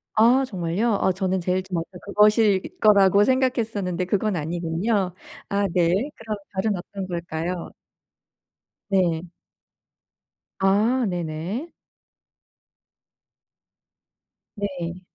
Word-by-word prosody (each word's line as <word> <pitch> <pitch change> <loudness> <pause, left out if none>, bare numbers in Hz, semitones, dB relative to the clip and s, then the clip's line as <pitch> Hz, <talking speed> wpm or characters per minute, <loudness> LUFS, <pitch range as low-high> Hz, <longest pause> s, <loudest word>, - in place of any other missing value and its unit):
아 240 +5 +5
정말요? 190 +2 -1
어 190 - +3
저는 190 0 -1
제일 185 +2 0
저한테 175 -3 -4 0.2
그것일 210 -1 +4 0.2
거라고 200 -1 +5
생각했었는데 225 -8 0
그건 205 +2 0
아니군요. 175 +5 -1 0.4
아 200 0 +1
네. 175 -2 +3 0.3
그럼 220 -1 -5 0.2
다른 200 +2 0
어떤 190 +2 -6
걸까요? 170 0 -4 1.2
네. 180 -4 +1 1.4
아 215 +6 +3
네네. 175 - -4 2.8
네. 185 -4 -4
190 Hz, 180 characters per minute, -24 LUFS, 175-215 Hz, 2.8 s, 아